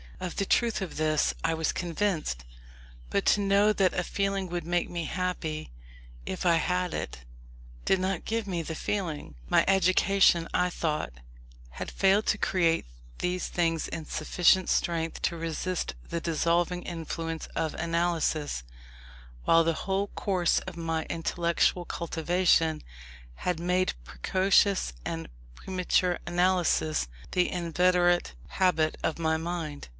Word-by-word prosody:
Of 180 - -4
the 200 - 0
truth 230 +1 +2
of 185 - -7
this 155 -1 +2
I 165 0 +1
was 160 -1 0
convinced, 170 - -2 0.7
but - - 0
to 205 - +4
know 200 +1 +4
that 190 -3 +2
a 180 - 0
feeling 195 0 -1
would 175 -1 -3
make 175 0 0
me 170 -2 -3
happy 160 - -3 0.6
if 185 - -4
I 170 -1 +5
had 180 +1 0
it, - - -4 0.7
did 190 - +3
not 185 -1 -2
give 225 -1 -1
me 180 -4 -2
the 160 0 -5
feeling. 160 - -3 0.2
My - - +4
education, 190 -2 +4
I 180 - +2
thought, 155 - -2 0.6
had - - -6
failed 195 +2 +3
to 215 - +2
create 170 -5 +1 0.3
these 180 0 -1
feelings 165 -2 0
in 160 -2 -5
sufficient 180 +4 +2
strength 165 -1 0
to 170 - 0
resist 165 - -3
the 170 - -2
dissolving 170 +2 +1
influence 165 -1 -4
of 160 -1 -1
analysis, 165 - 0 0.8
while 165 0 +6
the 165 0 +1
whole 195 +1 0
course 185 -4 +1
of 185 -2 -8
my 165 -1 -2
intellectual 170 +1 +1
cultivation 165 -1 +1 0.5
had 180 - -2
made 180 +2 +1
precocious 185 - +2
and 80 0 -4 0.3
premature 180 - 0
analysis 175 - +2 0.2
the 180 -1 +2
inveterate 175 - +2 0.2
habit 160 -5 +2
of 160 - 0
my 160 -1 +1
mind. 160 -3 -4
175 Hz, 135 wpm, -28 LUFS, 165-185 Hz, 0.8 s, while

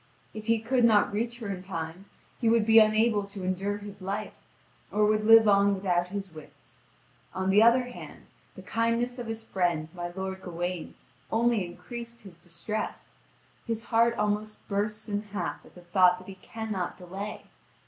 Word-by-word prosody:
If 215 0 -8
he 230 0 +4
could 240 +3 +1
not 215 -3 +4
reach 235 +3 -2
her 220 - -4
in 190 -2 -4
time, 175 0 -6 0.3
he 230 - +2
would 230 -1 +4
be 225 0 +8
unable 215 0 +4
to 200 -1 -8
endure 190 +2 -1
his 205 -1 -10
life, 200 +3 -4 0.6
or 210 0 +3
would 215 0 +2
live 225 0 +8
on 200 0 +5
without 180 -2 0
his 195 0 -5
wits 155 -1 -14 0.5
on 190 0 0
the 205 +2 +6
other 235 +3 +6
hand, 245 0 -11 0.2
the - - -10
kindness 230 +2 0
of 240 - -5
his 225 0 -4
friend, 175 -7 -1
my 175 -1 -4
lord 190 +1 -5
Gawain, 175 -1 -4 0.4
only 230 -2 +2
increased 235 +6 -8
his 175 -4 -13
distress; 180 +5 -5 0.5
his 225 -1 -2
heart 235 0 +3
almost 210 0 -2
bursts 210 +2 -2
in 205 -1 -1
half 200 -4 -5
at - - -21
the 180 - -12
thought 180 +1 +4
that 185 - -14
he 195 - -7
cannot 215 -5 -4
delay. 195 +3 -6
205 Hz, 175 wpm, -28 LUFS, 185-225 Hz, 0.6 s, be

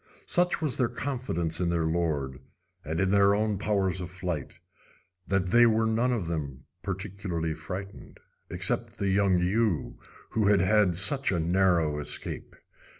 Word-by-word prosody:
Such 175 -2 +1
was 145 -5 0
their 125 -3 +1
confidence 120 - -3
in 90 -2 0
their 85 -2 0
lord, 80 -6 -1 0.4
and 80 +2 -3
in 95 +1 +2
their 100 0 +5
own 105 -2 0
powers 95 -3 0
of 90 - -5
flight, 90 -5 -5 0.7
that 95 -2 0
they 120 0 +7
were 110 0 +2
none 115 +3 +1
of 115 -7 -1
them 70 -5 -4 0.2
particularly 95 -4 -3
frightened, 90 +6 -8 0.3
except - - -2
the 100 - -1
young 95 -1 +3
ewe 90 -2 0 0.3
who 110 -2 +1
had 100 -1 +5
had 95 -1 +3
such 135 - +3
a 85 - 0
narrow 85 -3 +2
escape. 75 - -5
95 Hz, 150 wpm, -28 LUFS, 85-105 Hz, 0.7 s, they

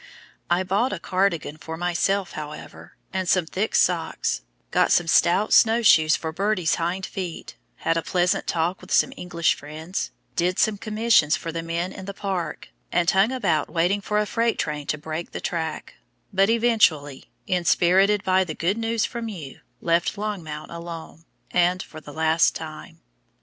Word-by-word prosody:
I 175 +2 +2
bought 200 +8 +1
a - - -3
cardigan 185 -5 -1
for 160 +1 -7
myself, 175 +3 0
however, 150 -1 -9 0.2
and 185 -1 -1
some 185 -3 +3
thick 195 +6 -2
socks, - - +1 0.3
got - - +3
some 175 - +4
stout 175 +5 +3
snow 230 +1 +5
shoes 155 -7 +6
for 160 - -4
Birdie's 190 -1 0
hind 180 +3 -1
feet, 180 -4 -6 0.2
had 165 - 0
a - - +1
pleasant 180 +1 0
talk 170 +2 -1
with 185 - -13
some 265 - +3
English 175 -6 0
friends, 155 +5 -5 0.3
did 180 +2 +1
some 210 -2 +2
commissions 215 -8 +3
for 165 - -5
the 165 0 -3
men 170 +2 -3
in 190 - -9
the 200 0 -7
park, 190 -4 -4 0.2
and 175 0 +3
hung 195 +5 +3
about 195 - 0
waiting 180 +4 +1
for 210 +1 -1
a 210 - +2
freight 230 +2 0
train 150 -1 -3
to 155 - -1
break 155 +2 -6
the - - -4
track, 160 -2 -4 0.4
but 195 +2 +3
eventually, 220 - +2 0.2
inspirited 185 +2 +3
by 190 -1 +3
the 160 -4 -6
good 190 +7 0
news 230 -1 0
from 235 -1 -5
you, 155 -10 -8 0.2
left 170 +4 +1
Longmount 175 -8 -5
alone, 170 -1 -8 0.3
and 180 +1 +2
for 155 - -11
the 145 - -11
last 160 +2 +2
time. 155 -1 -9
175 Hz, 170 wpm, -24 LUFS, 160-200 Hz, 0.4 s, shoes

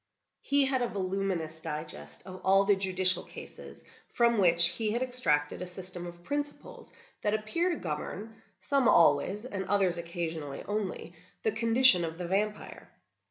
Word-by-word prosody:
He 280 0 +2
had 265 -1 0
a 245 - +1
voluminous 185 -5 -3
digest 150 - -6
of 185 0 -10
all 195 +1 +4
the 205 0 +4
judicial 185 -1 +3
cases, - - -11 0.2
from 235 -2 +2
which 170 -2 +6
he 215 -2 -2
had 240 +2 0
extracted 170 -14 +2
a 180 - -5
system 180 -1 -7
of 175 0 -12
principles 290 +6 -6 0.3
that 210 0 0
appear 275 +12 0
to 345 - -1
govern—some 220 - -3
always, 195 +5 +3
and 200 -6 -4
others 185 -3 +1
occasionally 165 -4 -5
only—the 190 -1 -5
condition 230 -3 +3
of 165 0 -5
the 180 - -5
vampire. 210 +4 -3
190 Hz, 145 wpm, -29 LUFS, 170-220 Hz, 0.3 s, which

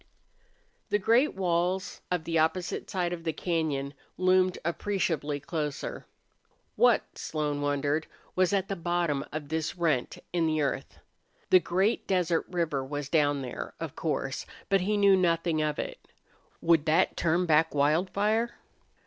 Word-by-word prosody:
The 205 - +3
great 230 +8 +3
walls 185 +1 -1
of 180 -3 -1
the 165 0 0
opposite 160 +3 0
side 180 -3 -1
of 170 -1 -6
the 165 - 0
cañon 150 -6 -1 0.2
loomed 185 0 +3
appreciably 165 -5 -1
closer. 150 0 -4 0.7
What, - - +2
Slone 150 -2 -2
wondered, 145 +2 0 0.3
was 185 -1 +3
at 195 -1 +1
the 195 - -2
bottom 170 -5 0
of 150 -1 -5
this 160 -1 -2
rent 155 -8 0 0.2
in 170 -2 +2
the 155 0 +1
earth? 135 -2 -2 0.5
The 185 - +8
great 190 +6 0
desert 180 -3 +1
river 165 -6 -1
was 145 +1 -5
down 145 -3 +2
there, 125 - -6
of - - -5
course, - - -2 0.2
but 195 -1 +3
he 205 +3 +1
knew 200 -1 +6
nothing 165 -3 +1
of 150 -1 -1
it. - - -6 0.5
Would 165 -2 +3
that 155 +1 +3
turn 170 +2 +1
back 160 -1 +3
Wildfire? 200 +10 +1
165 Hz, 145 wpm, -28 LUFS, 150-185 Hz, 0.7 s, The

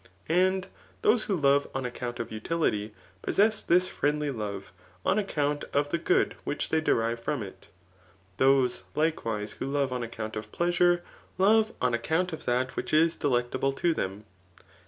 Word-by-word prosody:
And 185 +2 +2 0.4
those 215 +1 +4
who 200 - 0
love 140 -3 +3
on 135 -1 -2
account 120 0 -5
of 115 - -4
utility, 110 -3 -1 0.3
possess 215 +1 +2
this 180 +2 +3
friendly 150 -1 0
love 105 -5 -5 0.3
on 200 - +3
account 145 -7 -1
of 145 0 +1
the 170 - 0
good 175 - +2
which 145 - -3
they 160 - +2
derive 115 -5 +1
from 140 0 -2
it. 95 - -11 0.7
Those, 130 -2 +3
likewise, 115 -10 -1
who - - -3
love 140 -2 0
on 125 - -2
account 110 -2 -5
of 105 0 -6
pleasure, 175 0 +2 0.3
love 215 +3 +4
on 125 -1 +1
ac 120 - 0
count 180 +2 0
of 160 - -7
that 125 +1 0
which - - -4
is 165 +1 +4
delectable 130 0 0
to 170 +4 +1
them. 100 -4 -4
145 Hz, 165 wpm, -28 LUFS, 120-170 Hz, 0.7 s, those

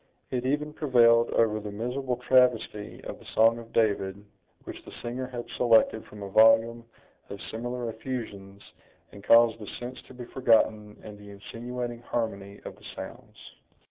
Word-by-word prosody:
It 125 0 -2
even 150 +2 -1
prevailed 120 -5 +4
over 110 -2 +2
the 105 0 -7
miserable 125 +5 -3
travesty 125 -4 +1
of - - -7
the - - -17
song 115 +1 +4
of 115 0 -12
David 100 -2 0 0.4
which - - -9
the - - -12
singer 125 +2 -4
had 120 -2 -6
selected 115 -2 +3
from 105 -1 -11
a - - -5
volume 115 +3 +4 0.4
of 100 - -7
similar 120 +1 -4
effusions, 110 -4 -7 0.5
and 100 - -13
caused 115 +1 +5
the 105 - -9
sense 125 +1 -7
to 130 - -14
be 125 -1 -8
forgotten 110 -4 +1
in 105 -1 -10
the 105 0 -13
insinuating 120 +4 -6
harmony 100 -4 -4
of - - -8
the - - -17
sounds. - - -10
115 Hz, 160 wpm, -27 LUFS, 105-125 Hz, 0.5 s, caused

